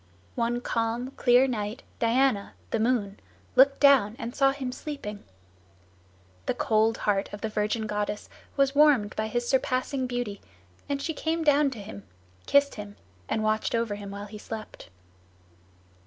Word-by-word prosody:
One 235 +1 -1
calm, 235 +2 -1
clear 250 0 +4
night 215 -2 -3 0.2
Diana, 230 -2 +2 0.2
the 225 - 0
moon, 220 -4 0 0.4
looked 275 +2 +6
down 265 -7 +5
and 230 +1 -5
saw 275 -1 +4
him 270 -2 -4
sleeping. 250 -7 -7 1.2
The - - 0
cold 220 +1 +2
heart 200 -1 0
of 205 - -8
the 220 - -2
virgin 215 +1 -1
goddess 210 0 -3 0.3
was 275 -1 +3
warmed 285 -8 +4
by 215 0 -1
his 240 +2 -2
surpassing 260 0 0
beauty, 245 -5 -4 0.5
and 280 -1 -1
she 320 +3 -2
came 325 +2 -1
down 295 -1 +4
to 250 -5 -8
him, 100 - -8 0.5
kissed 280 0 +4
him, 205 -1 -8 0.3
and 220 - 0
watched 215 +1 0
over 230 -2 0
him 205 -1 -7
while 200 +1 -6
he 210 0 -10
slept. 220 0 -8
230 Hz, 155 wpm, -27 LUFS, 210-270 Hz, 1.2 s, looked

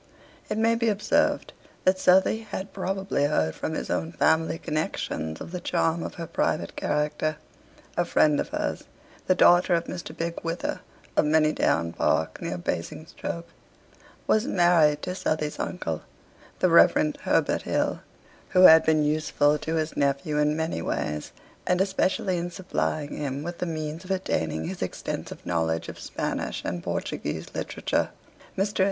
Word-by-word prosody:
It 210 - -1
may 225 +1 +3
be 230 0 +1
observed 205 -1 +1 0.3
that 185 0 +3
Southey 190 +4 +4
had 200 -3 -6
probably 195 -5 -1
heard 80 - +1
from 160 - -4
his - - -4
own 160 - -1
family 160 -1 +2
connections 80 - -3
of - - -8
the 180 - -4
charm 165 -1 0
of - - -5
her 170 - -5
private - - -1
character. 150 +1 -1 0.6
A - - +2
friend 150 -1 +3
of - - -2
hers, - - -3 0.4
the 185 - +4
daughter 175 0 +5
of 170 - 0
Mr. 175 -2 -6
Bigge 170 0 -3
Wither, 165 +1 -2 0.4
of - - +4
Manydown 150 - +2
Park 80 0 0
near 90 - -3
Basingstoke, 155 - -4 0.8
was 220 +4 +2
married 175 - +4
to 180 - -2
Southey's 155 -4 -2
uncle, 80 - -3 0.6
the - - +3
Rev. - - +5
Herbert - - +1
Hill, - - 0 0.5
who 185 - +4
had 160 -2 +10
been 155 -1 +3
useful 150 -1 +2
to 160 +2 -2
his 155 0 -1
nephew 140 +1 0
in 150 +1 +2
many 160 - -2
ways, 75 -2 -3 0.4
and 180 0 +2
especially 190 -1 +1
in 175 +1 -3
supplying 155 -4 -2
him 140 0 -3
with 170 +1 -6
the 180 - -2
means 155 +1 -4
of 185 - -13
attaining 80 - -1
his - - -5
extensive - - -5
knowledge 80 -1 -1
of - - -9
Spanish - - -3
and 85 0 -3
Portuguese - - -4
literature. - - -1 0.5
Mr. 200 +2 -1
160 Hz, 155 wpm, -26 LUFS, 150-180 Hz, 0.8 s, had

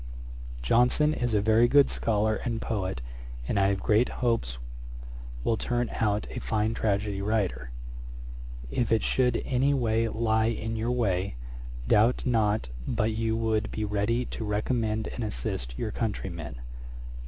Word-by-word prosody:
Johnson 125 - +4
is 120 -6 0
a 100 - +2
very 110 +2 +5
good 140 +2 +6
scholar 110 -1 +1
and 115 -2 -3
poet, 95 - -2 0.5
and 100 - +1
I 95 - +4
have 100 -1 +1
great 110 +5 +3 0.2
hopes 60 - +1 0.9
will 115 - +1
turn 120 +1 -1
out 105 -1 0
a - - -4
fine 110 0 0
tragedy 100 -2 0
writer. 100 - -1 1.0
If 120 - 0
it 115 - +3
should 125 -1 +2
any 135 +2 +2
way 115 -3 +1
lie 110 0 +1
in 115 0 -2
your 115 +2 -1
way, 100 - 0 0.5
doubt 110 - +4
not 110 - +1 0.2
but 110 +1 +1
you 110 0 0
would 110 -1 0
be 110 - -2
ready 105 +4 0
to 115 - -5
recommend 110 +1 0
and 120 - -5
assist - - -3
your 110 - -2
countryman. 95 - -3
110 Hz, 145 wpm, -28 LUFS, 105-115 Hz, 1.0 s, good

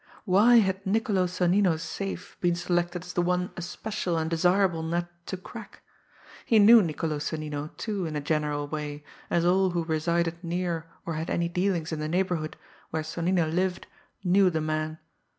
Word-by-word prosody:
Why 210 +5 +5
had 190 -4 +3
Niccolo 200 -2 +1
Sonnino's 180 -2 +2
safe 195 +4 -5
been 175 -1 +2
selected 175 0 -1
as 180 - -8
the 175 - +1
one 180 +1 0
especial 175 0 -3
and 160 0 -1
desirable 180 0 +2
nut 170 +2 -1 0.2
to 190 - -3
crack? 210 +3 -11 0.6
He 225 - +3
knew 220 +2 +8
Niccolo 155 -3 -2
Sonnino, 150 0 -4
too, 200 -6 -2
in 155 - -5
a - - 0
general 150 -1 -1
way, 150 -1 -5 0.3
as 170 0 +2
all 190 +2 +4
who 175 -1 -1
resided 170 +2 -1
near 170 -1 -2 0.2
or 165 - -3
had 160 +1 -3
any 170 0 0
dealings 175 -2 0
in 160 - -3
the 155 - -2
neighbourhood 175 -3 -1 0.3
where 160 0 -2
Sonnino 170 +2 0
lived, 180 +3 -1 0.4
knew 190 +1 +4
the 160 -2 -1
man. 155 0 -2
175 Hz, 170 wpm, -27 LUFS, 160-185 Hz, 0.6 s, knew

